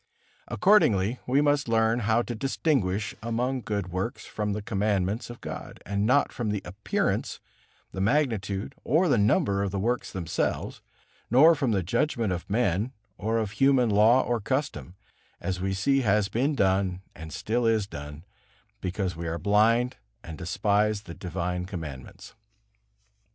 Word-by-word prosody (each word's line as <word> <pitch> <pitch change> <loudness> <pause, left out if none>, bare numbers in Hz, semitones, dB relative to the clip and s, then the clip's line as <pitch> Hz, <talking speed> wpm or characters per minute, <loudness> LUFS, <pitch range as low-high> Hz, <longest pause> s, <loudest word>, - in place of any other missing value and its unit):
Accordingly, 125 - +3
we 135 +3 +3
must 145 -2 +2
learn 115 0 +2
how 115 +1 +2
to 120 - -5
distinguish 110 - 0
among 125 +3 -1
good 100 -4 -3
works 95 +8 -3
from 105 -1 -3
the 105 - -3
Commandments 105 0 -1
of 120 - -10
God, - - -7
and 100 +1 0
not 145 +4 +3
from 115 -3 -3
the 105 -2 -2
appearance, 95 +4 -2 0.5
the 95 - -4
magnitude, 105 -5 0
or 160 +7 +3
the 130 -8 +3
number 100 - +2
of 100 - 0
the 100 - -4
works 120 +5 -1
themselves, 85 -4 -2 0.5
nor 150 +8 +7
from 145 -5 -1
the 100 -4 +1
judgment 110 - 0
of 90 - -6
men 105 +2 0 0.3
or 110 +3 0
of 110 -3 -1
human 130 -1 +3
law 110 +5 +5
or 120 -2 -1
custom, 115 - -3 0.4
as 95 -2 -3
we 95 +1 -1
see 135 +9 +2
has 105 -3 +2
been 140 +6 0
done 95 -3 +1
and 80 0 -9
still 115 +8 -1
is 110 -3 +2
done, 75 -4 -9 0.6
because 95 -1 -2
we 85 +1 -5
are 80 +1 -2
blind 115 +6 +2 0.3
and 80 - -8
despise 100 +4 0
the 85 - -9
divine 90 0 -3
Commandments. 80 - -8
105 Hz, 155 wpm, -27 LUFS, 95-120 Hz, 0.6 s, nor